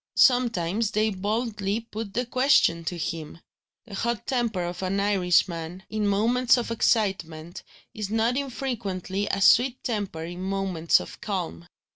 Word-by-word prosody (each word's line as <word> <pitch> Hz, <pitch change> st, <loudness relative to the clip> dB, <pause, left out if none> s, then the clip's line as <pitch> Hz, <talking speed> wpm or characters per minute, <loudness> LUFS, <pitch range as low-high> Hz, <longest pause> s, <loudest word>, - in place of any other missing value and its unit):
Sometimes 225 Hz, -, +3 dB
they 215 Hz, 0 st, +1 dB
boldly 210 Hz, +1 st, -2 dB
put 220 Hz, -2 st, -7 dB
the 245 Hz, +2 st, 0 dB
question 255 Hz, -10 st, +3 dB
to 175 Hz, -, -3 dB
him. 160 Hz, -1 st, -4 dB, 0.5 s
The 220 Hz, -, -12 dB
hot 235 Hz, +3 st, -2 dB
temper 235 Hz, -8 st, 0 dB
of 175 Hz, +1 st, -5 dB
an 190 Hz, +1 st, -1 dB
Irishman, 180 Hz, -3 st, +1 dB
in 215 Hz, -1 st, 0 dB
moments 235 Hz, +6 st, +3 dB
of 235 Hz, -1 st, -3 dB
excitement, 180 Hz, -8 st, 0 dB, 0.3 s
is 210 Hz, -2 st, -4 dB
not 225 Hz, +3 st, +1 dB
infrequently 210 Hz, -8 st, -3 dB
a 195 Hz, -, -1 dB
sweet 245 Hz, +5 st, +4 dB
temper 205 Hz, -8 st, -3 dB
in 175 Hz, +2 st, -7 dB
moments 190 Hz, -4 st, +1 dB
of 90 Hz, -, -10 dB
calm. 85 Hz, +1 st, -4 dB
205 Hz, 140 wpm, -26 LUFS, 180-230 Hz, 0.5 s, sweet